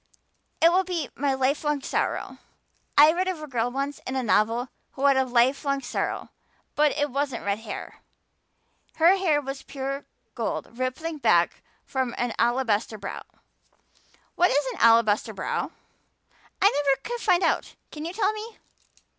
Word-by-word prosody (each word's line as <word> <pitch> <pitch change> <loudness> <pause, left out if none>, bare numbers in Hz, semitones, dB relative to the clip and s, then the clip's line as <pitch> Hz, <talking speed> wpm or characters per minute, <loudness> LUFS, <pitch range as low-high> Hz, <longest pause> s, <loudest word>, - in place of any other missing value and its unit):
It 330 - +7
will 370 +2 +3
be 340 -7 -3
my 275 0 0
lifelong 280 +2 0
sorrow. - - -2 0.6
I 300 +2 +9
read 365 +2 -1
of 370 -4 -2
a 305 - -6
girl 245 -4 -1
once 275 +2 -3
in 260 - -3
a 260 - 0
novel 230 +3 +2 0.2
who 275 - -2
had 280 -1 +6
a 265 0 +3
lifelong 265 +3 +2
sorrow - - -3 0.4
but 300 0 +3
it 290 -1 -1
wasn't 275 -4 -2
red 200 +1 0
hair. 225 -2 -8 1.0
Her 340 +4 +5
hair 330 -6 +2
was 270 -1 -6
pure 275 0 -5 0.3
gold - - -4
rippling 265 +6 -3
back - - +3 0.2
from 260 -3 -2
her 245 -1 -2
alabaster 230 -3 +1
brow. 195 -1 -6 1.1
What 355 - +3
is 285 +1 +2
an - - -10
alabaster 230 -2 +4
brow? - - -2 0.9
I 395 - +6
never 275 -2 +1
could 480 0 -4
find 365 -3 +3
out. - - 0 0.2
Can 300 - -7
you 335 +2 -4
tell 410 0 +1
me?" 435 +1 -8
275 Hz, 155 wpm, -25 LUFS, 245-315 Hz, 1.1 s, I